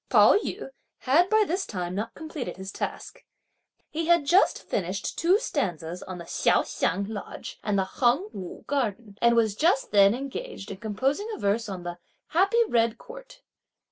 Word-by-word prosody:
Pao - - +7
yü 430 - -2 0.3
had 325 +8 +3
by 435 0 +5
this 370 +4 -1
time 180 -3 -4
not 210 +4 -4
completed 295 - -6
his 190 +1 -7
task. - - -6 0.7
He 325 +1 -2
had 340 -3 +4
just 355 +7 +3
finished 190 0 -3
two 355 +4 +4
stanzas 180 - -3
on 185 -1 -7
the 170 - -8
Hsiao - - +2
Hsiang 195 +4 -1
Lodge 210 -2 -7
and 205 -1 0
the 190 - +2
Heng 245 - +1
Wu 185 -2 -8
garden, 230 -6 -2
and 235 0 +5
was 220 -3 +3
just 305 - +1
then 200 +1 +6
engaged 275 - -6
in 195 - -6
composing 265 - -1
a - - -11
verse 210 +2 0
on 185 -3 -6
the 175 0 -6 0.3
"Happy 395 +8 +3
red 230 - +2
Court." - - -13
235 Hz, 170 wpm, -26 LUFS, -, 0.7 s, Pao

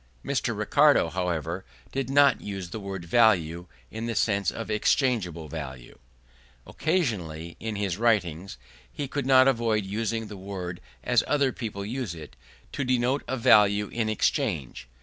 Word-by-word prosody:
Mr. - - -1
Ricardo, 80 - +4
however, 90 0 -2 0.3
did 135 -1 -3
not 140 0 +4
use 95 -4 -6
the 110 - -5
word 95 -3 -6
value 90 -5 +3 0.2
in 115 +1 -4
the 115 - -3
sense 100 -3 +1
of - - -5
exchangeable 105 - +1
value. 65 -5 -8 0.7
Occasionally, 95 - -2
in 110 -1 -4
his 100 -3 -2
writings, 95 - 0 0.3
he 145 - -4
could 140 0 -3
not 130 -1 +6
avoid 115 -5 +1
using 110 +3 -2
the 105 -1 -9
word 95 -2 -6 0.2
as 120 -2 +3
other 140 -3 +2
people 105 -5 -5
use 115 -5 -4
it, 75 -6 -11 0.4
to 140 - -2
denote 125 +2 +1
value 105 -5 +4
in 115 -2 -1
exchange. 95 - -1
105 Hz, 145 wpm, -26 LUFS, 90-120 Hz, 0.7 s, not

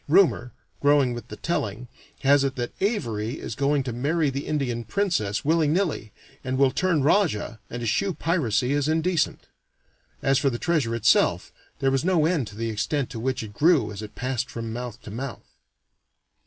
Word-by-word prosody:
Rumor, 155 -7 +4 0.3
growing 145 -3 +4
with 120 - -7
the - - -8
telling, 120 -7 -3 0.3
has 140 +1 +5
it 135 -1 -1
that 120 -1 -4
Avary 120 - -1
is - - -6
going 140 0 +1
to 125 -2 -4
marry 145 +4 +1
the 140 +2 -4
Indian 130 -6 -1
princess, 115 - -1
willy 160 0 +3
nilly, 155 - 0 0.3
and 130 0 -2
will 135 -1 +4
turn 170 -2 +1
rajah, 140 - +1
and 120 0 -5
eschew 180 - 0
piracy 130 - +1
as 145 0 +1
indecent. 160 +1 +1 0.8
As 135 0 +3
for 135 - +2
the 120 - -3
treasure 145 -7 0
itself, 115 -1 +2 0.2
there 135 0 +1
was 135 -1 +1
no 175 -3 +3
end 160 -8 +1
to 105 - -11
the 115 +1 -2
extent 125 +5 -1
to 115 - -5
which 130 +1 -1
it 105 -2 -9
grew 145 - +3
as 100 0 -7
it 105 0 -9
passed 130 0 -2
from 115 -1 -5
mouth 120 -2 -6
to 105 - -9
mouth. 120 0 -7
135 Hz, 180 wpm, -25 LUFS, 115-155 Hz, 0.8 s, has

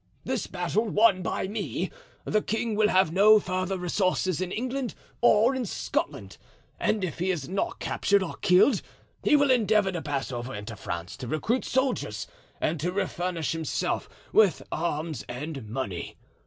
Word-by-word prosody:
This 255 -4 -2
battle 180 +5 0
won 210 -3 +4
by 180 - -2
me, 205 +1 -3 0.3
the 215 - +2
king 225 +1 -1
will 210 0 +4
have 185 -5 +3
no 210 +4 +7
further 185 0 -2
resources 185 -1 0
in 185 -1 -2
England 255 +3 -3 0.3
or 235 +1 +5
in 260 -1 -1
Scotland; 220 - -3 0.4
and 215 -3 +1
if 170 -3 -3
he 180 +2 0
is 155 -8 -1
not 195 +4 -2
captured 200 -1 +1
or 180 - -4
killed, 180 +10 +4 0.4
he - - +5
will 285 -2 +4
endeavor 215 -5 +3
to 175 -3 -3
pass 140 -2 -2
over 120 -1 -4
into 105 +2 -6
France 85 -3 -5
to 125 - -6
recruit 220 - 0
soldiers 260 0 0 0.3
and 155 +1 0
to 175 +5 -1
refurnish 180 -4 -2
himself 160 -3 -2 0.2
with 210 -6 +4
arms 160 -1 -2
and 135 -2 -6
money. 105 -8 -4
185 Hz, 160 wpm, -27 LUFS, 155-215 Hz, 0.4 s, no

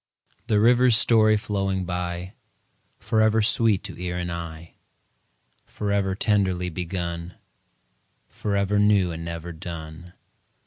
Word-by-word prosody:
The 105 - +2
river's 120 +1 +5
story 110 -2 +4
flowing 95 -2 -2
by, 90 +1 -4 0.6
Forever 110 0 +2
sweet 110 -2 +2
to - - -7
ear 90 -1 -3
and 90 -1 -3
eye, 85 -1 -7 0.9
Forever 100 -2 -1
tenderly 95 -4 +1
begun 85 0 -5 0.9
Forever 100 0 -1
new 100 -4 +3
and 85 0 -6
never 85 0 -6
done. 85 0 -9
95 Hz, 105 wpm, -24 LUFS, 85-105 Hz, 0.9 s, river's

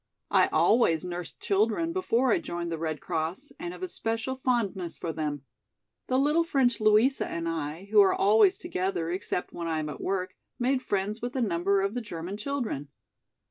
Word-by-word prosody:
I - - +5
always 180 -9 +3
nursed 175 -1 -6
children 225 +12 +1
before 260 -9 +2
I - - +3
joined 170 0 -4
the 165 - -3
Red 155 -2 -2
Cross 175 - -3
and 345 +2 -4
have 365 - -9
a - - -1
special 230 -4 -2
fondness 220 -9 -1
for 165 - -4
them. 150 -3 -3 0.6
The 255 - +1
little 300 +5 +3
French 270 -7 +2
Louisa 215 +6 +4
and 170 0 -3
I, 165 +3 -4
who 210 -1 +8
are 195 - +5
always 205 -1 +5
together 180 -3 -2
except 180 0 -3
when 170 -1 -4
I 160 -1 0
am 155 -1 -2
at 145 - -7
work, 185 -1 -2 0.2
made 255 +1 +1
friends 205 0 -2
with 245 +2 -4
a - - 0
number 195 -1 +2
of 195 +1 -1
the 245 - -2
German 180 -3 -6
children. 225 - -3
200 Hz, 185 wpm, -28 LUFS, 170-245 Hz, 0.6 s, who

